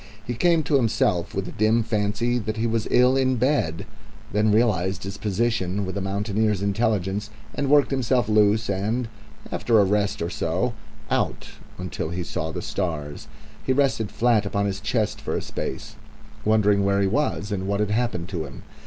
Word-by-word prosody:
He 120 - -2
came 165 +6 +3
to 150 - +2
himself 115 -7 +1
with 95 -1 -2
a - - -6
dim 110 +2 +2
fancy 110 +2 0
that 110 0 -4
he 110 - 0
was 115 -1 0
ill 125 +1 +5
in 130 -1 +2
bed; 120 - 0 0.5
then 105 +1 +2
realised 100 -4 +1
his 100 0 -5
position 105 -2 0
with 95 - -5
a 100 - -2
mountaineer's 100 +1 0
intelligence, 100 -1 0 0.2
and 140 -1 -1
worked 145 -1 +5
himself 125 -3 +1
loose 105 +1 +3
and, 105 +5 -1 0.4
after 115 -2 +2
a - - +6
rest 100 +1 +1
or 85 - -2
so, 90 +10 -1 0.4
out - - -1 0.3
until 90 -3 -4
he 90 +1 -3
saw 80 -1 -3
the - - -5
stars. 75 -6 -3 0.4
He 130 - +1
rested 130 -6 +1
flat 115 -3 +2
upon 100 0 -1
his 100 -1 -2
chest 105 0 -1
for - - -2
a - - -1
space, - - -5 0.5
wondering 105 -2 +3
where 100 0 +2
he 100 - +3
was 105 -2 -1
and 95 -2 -2
what 100 0 0
had 105 -1 0
happened 110 -6 -1
to 85 -5 -3
him. 70 - -11
105 Hz, 180 wpm, -24 LUFS, 95-115 Hz, 0.5 s, a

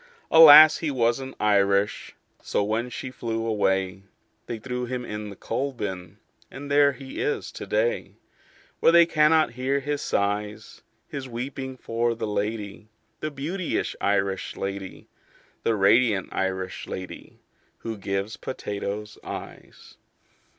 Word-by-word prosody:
Alas, 155 -1 +10
he 160 - -2
wasn't 130 0 0
Irish. 100 -1 +1 0.3
So - - -1
when 110 +4 -1
she 130 +1 -6
flew 115 -2 -3
away, 95 -3 0 0.5
They 120 - -4
threw 125 +2 -4
him 125 0 -4
in 105 -1 -6
the 100 - -9
coal 135 +7 -3
bin 95 -5 -6 0.3
And 140 +2 -8
there 145 0 +5
he 135 -1 -7
is 430 0 -2
to - - -8
day, - - -1 0.6
Where - - +5
they 170 0 +7
cannot 155 -3 +3
hear 130 +3 -1
his 145 +1 -3
sighs 105 +1 -2 0.3
His 135 -2 -6
weeping 130 +2 -5
for 115 0 -1
the 115 - -4
lady, 105 0 -4 0.3
The 155 - -3
beauteous 155 +6 -3
Irish 100 -1 0
lady, 95 -1 -6 0.5
The 115 - +1
radiant 105 0 +3
Irish 95 -1 -3
lady 95 -1 -8 0.4
Who 115 -1 -4
gives 100 +1 -3
potatoes 105 -3 -5
eyes." - - -10
115 Hz, 130 wpm, -25 LUFS, 100-135 Hz, 0.6 s, Alas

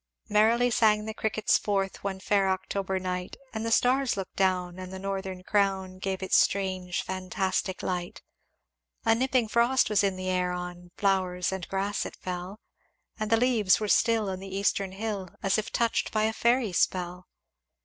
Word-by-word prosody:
"Merrily 230 +4 +4
sang 215 -2 +3
the 220 - -4
crickets 215 0 +1
forth 195 -2 -2
One 195 -1 -3
fair 195 0 +2
October 190 0 -2
night; 180 -1 -4 0.2
And 220 0 -3
the 230 - -2
stars 250 0 +3
looked 190 -2 -5
down, 185 -2 0
and 185 0 -7
the 190 - -6
northern 190 -1 -4
crown 190 -2 0
Gave 190 0 -3
its 190 - +3
strange 185 -2 +1
fantastic 185 0 -2
light. 180 -1 -3 0.8
"A 225 - +5
nipping 255 0 +1
frost 235 +2 +3
was 205 - +3
in 195 -1 +1
the 185 0 -5
air, 180 -1 0
On 180 0 -6
flowers 185 -2 +1
and 190 -2 -4
grass 195 +1 -1
it - - -11
fell; 180 +3 -6 0.6
And 215 0 -2
the 225 - +4
leaves 225 -6 +3
were 215 - -2
still 225 0 +3
on 185 - -5
the 195 0 -6
eastern 195 -1 0
hill 200 -2 -4
As 195 +2 +2
if 215 - -5
touched 235 -1 0
by 215 -1 +1
a 220 +1 +1
fairy 235 -3 +2
spell. 180 0 0
195 Hz, 175 wpm, -28 LUFS, 185-215 Hz, 0.8 s, A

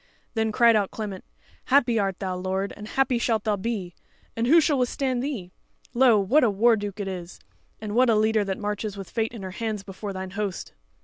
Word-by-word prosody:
Then 220 -1 0
cried 235 +1 +5
out 205 -2 +2
Clement: 205 -4 -6 0.4
"Happy 245 -4 +3
art 195 -2 -1
thou, 185 -2 -3
lord, 190 +2 -2
and 210 0 -9
happy 260 0 +1
shalt 225 -3 0
thou 215 -2 +1
be, 200 -4 -4 0.4
and 230 +1 0
who 330 +6 +7
shall 295 -3 +2
withstand 255 0 0
thee? 240 -10 -4 0.4
Lo! 240 -3 +5
what 250 +10 +3
a 240 - +4
war 225 +4 +4
duke 205 -1 -5
it 200 - -3
is! 180 -2 -7 0.4
and 210 -1 -5
what 250 +2 +4
a 225 - +4
leader 215 0 +2
that 195 -1 -3
marches 210 0 -3
with 195 -2 -8
fate 225 -1 -1
in 225 -4 -8
her 185 - -5
hands 215 0 -4
before 200 +1 -7
thine 190 -1 -6
host!" 200 -2 -4
215 Hz, 210 wpm, -25 LUFS, 195-235 Hz, 0.4 s, who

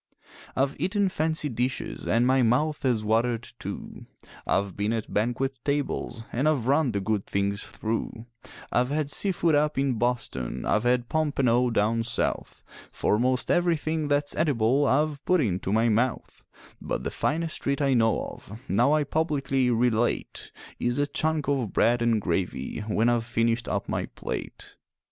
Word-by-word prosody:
I've 135 +1 +1
eaten 200 +1 +1
fancy 160 -2 +1
dishes 125 0 -3
an' 115 +2 +3
my 130 +1 +4
mouth 135 +6 +1
has 120 -5 +1
watered, 115 +2 +1
too; - - -7 0.4
I've 100 -1 0
been 105 +2 -1
at 110 -2 -4
banquet 120 +5 -1
tables 140 -5 -2
an' 130 +5 0
I've 145 -7 +1
run 140 0 +2
the 100 - -1
good 105 0 -2
things 100 +1 -1
through; 115 +1 -4 0.5
I've 125 +1 +2
had 145 0 -1
sea 200 - +2
food 170 -3 +1
up 150 0 +2
in 135 -4 0
Boston, 120 - -2
I've 105 - +1
had 120 0 +2
pompano 130 -6 +2
down 115 0 +1
South, 115 0 -2 0.3
For 105 - +1
most 125 +1 +1
everything 160 -3 +1
that's 145 0 0
edible 140 -2 +2
I've 150 +1 +1
put 180 0 +3
into 95 - -1
my 110 +2 +3
mouth; 115 +2 -1 0.4
But - - -3
the - - -3
finest 165 +1 -1
treat 140 0 -1
I 140 -2 +2
know 115 -3 +2
of, 105 +3 -9
now 120 +9 +3
I 155 -1 +3
publicly 140 -4 0
relate, 120 0 0 0.3
Is 120 +1 0
a 145 - +2
chunk 155 0 -1
of 135 -7 -1
bread 120 +1 +3
and 115 -2 +2
gravy 90 -1 -2
when 110 +2 +1
I've 120 -1 +2
finished 115 0 0
up - - -2
my - - -2
plate. - - -7
125 Hz, 160 wpm, -26 LUFS, 115-145 Hz, 0.5 s, my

